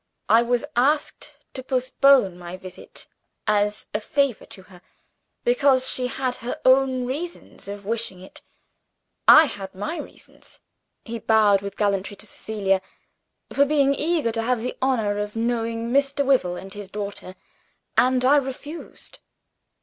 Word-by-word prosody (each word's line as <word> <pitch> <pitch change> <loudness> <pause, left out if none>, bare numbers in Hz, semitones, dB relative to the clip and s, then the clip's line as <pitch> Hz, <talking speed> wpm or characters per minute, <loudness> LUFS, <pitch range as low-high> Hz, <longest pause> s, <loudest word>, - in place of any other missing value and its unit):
I 225 - +6
was 240 0 0
asked 290 +5 0 0.2
to 260 - -6
postpone 255 -6 +3
my 175 +1 -8
visit, 185 -1 -10 0.4
as 210 -1 0
a 210 - -1
favor 275 +1 0
to 190 - -11
herself, 185 -2 -17 0.6
because 280 - +3
she 250 -1 +1
had 255 0 -3
her 245 0 -5
own 260 -1 +4
reasons 315 +8 -6
for 200 +1 -5
wishing 205 -2 -4
it. 185 - -12 0.9
I 315 - +9
had 195 -8 -7
my 210 - -4
reasons" - - -12 0.5
(he 230 0 -5
bowed 210 -3 +4
with 200 0 -7
gallantry 200 -1 -1
to 215 - -10
Cecilia) 195 -2 -1 0.7
"for 280 - +4
being 280 -1 +3
eager 305 -4 0
to 225 0 -2
have 240 0 0
the 250 - -3
honor 220 -6 +1
of 210 +1 -4
knowing 230 0 -2
Mr. 280 +1 +2
Wyvil 245 -10 +2
and 190 0 -11
his 205 -2 -8
daughter; 200 -2 -6 0.6
and 255 0 +3
I 285 +3 +6
refused." 290 +4 -6
235 Hz, 145 wpm, -23 LUFS, 205-270 Hz, 0.9 s, I